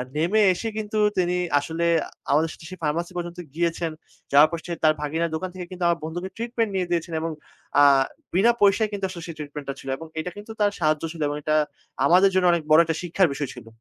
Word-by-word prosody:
নেমে 175 +8 +2
এসে 225 - -4
কিন্তু 215 0 -3 0.2
তিনি 180 -1 +2 0.2
আসলে 165 +3 -2 0.5
আমাদের 155 +3 +3
সাথে 160 - -14
সেই 185 -1 -9
ফার্মাসি 170 +4 -1
পর্যন্ত 175 0 -5 0.2
গিয়েছেন। 170 0 -1 0.4
যাওয়ার 145 +2 +7
পর 170 - -3 0.2
তার 155 -1 +6
ভাগিনা 160 +3 -1
দোকান 185 +4 -3
থেকে 180 -1 -6
কিন্তু 180 -1 -5
আমার 170 -1 +2
বন্ধুকে 175 +4 -4
ট্রিটমেন্ট 230 -1 -1
নিয়ে 185 -2 0
দিয়েছেন 170 0 -1
এবং 165 0 -2 0.5
আ - - +8 0.5
বিনা 200 +7 +5
পয়সায় 205 +2 +4
কিন্তু 200 -1 -2
আসলে 170 -3 -8
সেই 165 - -7
ট্রিটমেন্টটা 145 -2 -6
ছিল - - -12
এবং 165 - -9
এটা 175 +3 -4
কিন্তু 210 +2 -9
তার 205 -1 +3
সাহায্য 155 -1 +1
ছিল 165 -2 -9
এবং 145 0 -3
এটা 155 +1 +1 0.5
আমাদের 185 +6 +6
জন্য 185 -1 +3
অনেক 170 -2 0
বড় 155 - +8
একটা 160 0 -2
শিক্ষার 180 +1 +2
বিষয় 140 -1 -3
ছিল। 120 -2 -11
170 Hz, 210 wpm, -24 LUFS, 155-185 Hz, 0.5 s, আ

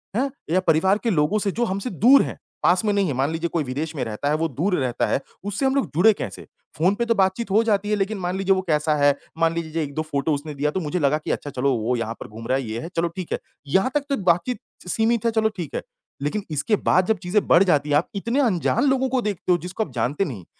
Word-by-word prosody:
हैं? 265 +5 +1 0.2
या 185 - +4
परिवार 180 +5 +4
के 235 - +1
लोगों 165 +3 +2
से, 200 -1 -1
जो 240 +5 0
हमसे 195 +3 -3
दूर 245 - +6
हैं, - - -6 0.3
पास 180 +4 +3
में 210 - +2
नहीं 200 -2 +2
है 145 - -1
मान 135 +4 0
लीजिए 165 +1 -2
कोई 165 -3 +1
विदेश 145 +5 -4
में 135 - -2
रहता 115 +5 -3
है, 150 - +2
वो 165 +1 0
दूर 175 - 0
रहता 125 -3 0
है, - - +1 0.2
उससे 205 +6 -2
हम 265 0 +2
लोग 275 - +1
जुड़े 210 +7 +6
कैसे? - - -6 0.3
फ़ोन 180 +6 +3
पे 235 - -1
तो 230 0 +2
बातचीत 190 +2 +1
हो 215 +3 +4
जाती 210 -2 +1
है 210 - +2
लेकिन 205 +1 -1
मान 180 +1 -2
लीजिए 195 0 +2
वो 190 - 0
कैसा 150 0 +2
है, 145 -1 +4 0.2
मान 165 0 +2
लीजिए 165 -2 -4
जो 165 - -2
1-2 150 0 -2
फ़ोटो 145 +2 0
उसने 150 +2 -4
दिया, 150 +2 0
तो 190 - -2
मुझे 175 +1 -2
लगा 145 0 +2
कि, 155 - -4
अच्छा 145 - -3
चलो, 135 +1 0
वो 115 +3 0
यहाँ 115 -1 -2
पर - - -8
घूम 115 +2 -9
रहा 130 - +2
है, 135 - -3
ये 110 -1 -4
है, 165 - -6
चलो 170 - +2
ठीक 185 -3 -5
है, - - -1 0.3
यहाँ 190 - +2
तक 295 - +2
तो 275 - +1
बातचीत 175 +9 -2 0.3
सीमित 225 +3 +1
है, 230 - +3
चलो 220 -1 +2
ठीक 170 -5 -5
है। - - -1 0.4
लेकिन 175 +9 -2
इसके 150 +9 +1
बाद 185 - +3
जब 220 +2 +1
चीज़ें 195 +4 +1
बढ़ 170 - +6
जाती 150 -6 +2
हैं, 145 - +3
आप 160 - 0
इतने 230 +7 -1
अनजान 230 +1 +1
लोगों 265 -1 +1
को 255 -1 +1
देखते 200 -4 -2
हो, 175 - +5
जिसको 180 +5 -3
आप 150 - -10
जानते 130 +10 0
नहीं, 110 - -7
175 Hz, 275 wpm, -23 LUFS, 150-210 Hz, 0.4 s, दूर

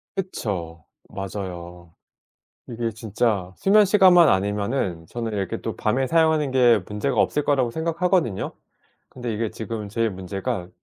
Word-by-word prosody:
그쵸. 90 - -4 0.2
맞아요. 90 -3 -7 0.7
이게 115 -1 -3
진짜 105 -3 -1
수면시간만 195 -4 +6
아니면은 100 -3 -1
저는 115 -2 -4
이렇게 100 -3 -3
또 - - -4
밤에 130 +4 0
사용하는 160 -3 +2
게 120 -4 +5
문제가 105 +6 -2
없을 150 - +2
거라고 130 -4 +2
생각하거든요. 165 - 0 0.6
근데 120 -3 -5
이게 110 0 -2
지금 110 -2 -6
제일 115 +2 0
문제가 95 -1 -4
115 Hz, 310 characters per minute, -23 LUFS, 95-140 Hz, 0.7 s, 수면시간만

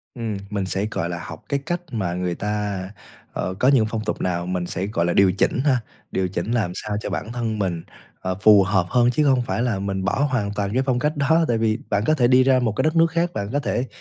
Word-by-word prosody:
Ừm, 115 -4 -3
mình 100 -2 -2
sẽ, 95 +2 -1
gọi 85 - -2
là, 85 -1 -5
học - - -9
cái 140 - +1
cách 175 +1 -2
mà 95 -8 -2
người 90 -1 -2
ta, 105 -1 -2 0.5
ờ, 90 - -2
có 125 - +3
những 135 -5 +5
phong 110 -1 -3
tục - - -3
nào 85 -1 -1
mình 90 -1 -2
sẽ, 95 +2 -3
gọi 85 -5 0
là, 85 - +1
điều 100 -1 +5
chỉnh 100 +6 +1
ha. 135 -4 +4 0.3
Điều 95 -1 0
chỉnh 90 +4 -3
làm 110 -7 0
sao 105 -1 -3
cho - - -4
bản 110 - -4
thân 115 -3 -2
mình, 90 -4 -2 0.4
ờ, 95 0 -2
phù 105 -2 +7
hợp 95 -2 +1
hơn 120 -1 +3
chứ 150 +5 +1
không 130 -3 +4
phải 120 - -2
là 120 -5 0
mình 95 -1 -2
bỏ 135 +9 +1
hoàn 105 -5 -1
toàn 100 0 -2
cái 130 +2 +2
phong 130 -3 +1
cách 150 +3 -1
đó. 160 +4 +3
Tại 115 - +1
vì 110 -1 +1
bạn 100 0 +1
có 155 - +3
thể 125 -6 +3
đi 130 +1 +5
ra 130 -1 +4
một 120 -3 +1
cái - - 0
đất 155 +1 +1
nước 165 0 +5
khác, 170 +1 0
bạn 100 -1 -3
có 145 - +2
thể 130 -2 -1
110 Hz, 270 wpm, -22 LUFS, 95-130 Hz, 0.5 s, phù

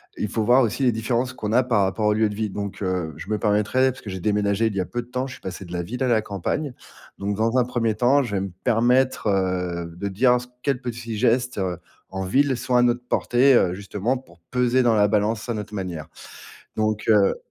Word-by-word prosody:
il 105 - -3
faut 110 - -1
voir 125 +4 +5
aussi 120 +3 0
les 125 -2 +3
différences 120 +3 -1
qu'on 110 -4 -4
a 125 +3 +4
par 120 -5 +2
rapport 95 +3 -1
au 105 - +4
lieu 110 0 +2
de 105 - -6
vie 110 0 -2
donc, 100 +1 -5
heu, 90 -4 -2
je - - -9
me 105 - 0
permettrais, 105 +6 +2
parce 130 - -13
que 105 - -8
j'ai 95 -1 -5
déménagé 105 +1 +1
il 105 - -3
y - - -1
a 90 - 0
peu 120 - -4
de 120 - -15
temps. 125 +1 -2
Je 130 - -8
suis - - -13
passé 95 +1 -7
de 90 - -10
la 85 - -1
ville 125 +9 -4
à - - +1
la 115 -3 +3
campagne 110 - -3 0.4
donc, 100 +1 -2
dans 115 +3 +1
un 125 - +3
1er 115 -3 0
temps, 130 +5 +3
je 105 -5 -4
vais 95 - 0
me 95 -1 -4
permettre, 125 +2 +2
heu, 90 -3 -1
de 95 +4 -4
dire 125 +6 +3
ce 125 - -10
que 125 - -30
quels 135 -3 0
petits 115 -2 -5
gestes, 125 +1 +1
heu, 95 -3 -1 0.3
en 95 0 -4
ville 135 +8 +2
sont 125 +1 -2
à 125 - +6
notre 120 0 +2
portée, 125 +2 +3
heu, 90 -6 +3
justement 100 +5 -2
pour 85 -10 -17
peser 125 +1 +2
dans 115 -2 +3
la 105 -1 +4
balance 110 +2 0
à - - +1
notre 105 0 -6
manière. 90 -6 -5 0.7
Donc, 110 0 0
heu 105 -3 +4
110 Hz, 255 wpm, -23 LUFS, 100-125 Hz, 0.7 s, à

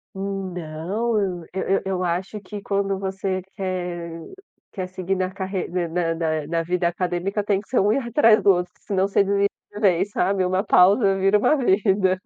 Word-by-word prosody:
Não, 195 +2 -3
eu 180 -5 -2
eu 190 +1 0
eu 185 -1 -1
acho 180 +4 -2
que 205 +2 -7
quando 195 -1 -1
você 190 0 -2 0.2
quer 180 -3 -3 0.6
quer 185 -3 -4
seguir 185 +1 -3
na 185 0 -1
carre 190 -1 -3
ne 175 -1 -2
na 165 -2 -1
na 165 0 0
vida 175 +1 0
acadêmica 180 +3 -1
tem 200 -1 0
que - - -26
ser 260 - +2
um 205 - +3
erro 235 +2 0
atrás 230 -4 +5
do 200 - +5
outro 180 -1 +1
que - - -33
senão 195 -1 0
você 200 0 +3
desiste 200 0 +2 0.2
de 205 - -7
vez 190 -1 +2
sabe. 195 -1 +1
Uma 185 +1 +1
pausa 195 +1 +4
vira 195 +2 +4
uma 300 - +3
vida. 190 -6 +2
190 Hz, 185 wpm, -23 LUFS, 180-200 Hz, 0.6 s, atrás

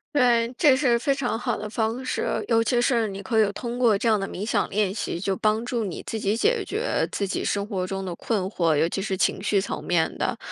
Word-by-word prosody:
对， 240 -3 +3
这 285 -5 +6
是 250 -4 +3
非 275 - 0
常 245 -4 -1
好 - - -1
的 210 - -5
方 225 +4 -2
式， - - -1 0.2
尤 230 -1 +3
其 240 +2 +1
是 235 -2 +2
你 195 0 -6
可 220 +2 +2
以 200 - 0
通 240 +3 -5
过 230 -5 +4
这 230 - -1
样 215 -2 +3
的 195 - -3
冥 200 - -5
想 215 -3 0
练 200 -1 0
习， 200 -4 -3
就 195 0 -1
帮 215 +3 +1
助 240 -2 -1
你 185 -5 -5
自 220 - -4
己 210 +2 0
解 450 - +2
决 435 +5 -3 0.3
自 200 - -2
己 190 - -2
生 200 0 -1
活 190 -3 -3
中 195 0 -4
的 180 - -4
困 210 +4 -1
惑， 170 -5 +1
尤 160 +3 +3
其 195 - -3
是 190 -1 -2
情 190 - +1
绪 205 0 +2
层 195 - -4
面 170 -2 +1
的， - - -1
215 Hz, 275 characters per minute, -25 LUFS, 195-240 Hz, 0.3 s, 这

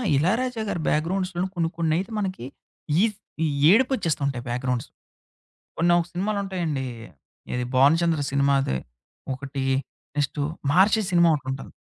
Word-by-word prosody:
'ఇలయరాజా' 225 - +1
గారి 175 - -2
బ్యాక్‌గ్రౌండ్స్‌లొ 180 +3 0
కొన్ని, 165 -2 0
కొన్నైతే 170 +5 0
మనకి 185 - -3 0.6
ఈజ్ 215 -1 +2 0.6
ఏడుపొచ్చేస్తుంటాయి 170 - +1
బ్యాక్‌గ్రౌండ్స్. 125 0 -2 0.9
కొన్నొక 175 0 +3
సినిమాలుంటాయండి. 185 -7 -2 0.7
ఏది 125 0 -1
'భానుచంద్ర' 160 +3 +4
సినిమాది. 140 - +2 0.6
ఒకటి. 135 0 -5 0.5
నెక్స్టు 145 +1 0 0.3
'మహార్షి' 195 +8 +4
సినిమా 170 -1 +5
ఒకటుంటది. 135 -1 -6
165 Hz, 95 wpm, -25 LUFS, 140-190 Hz, 0.9 s, సినిమా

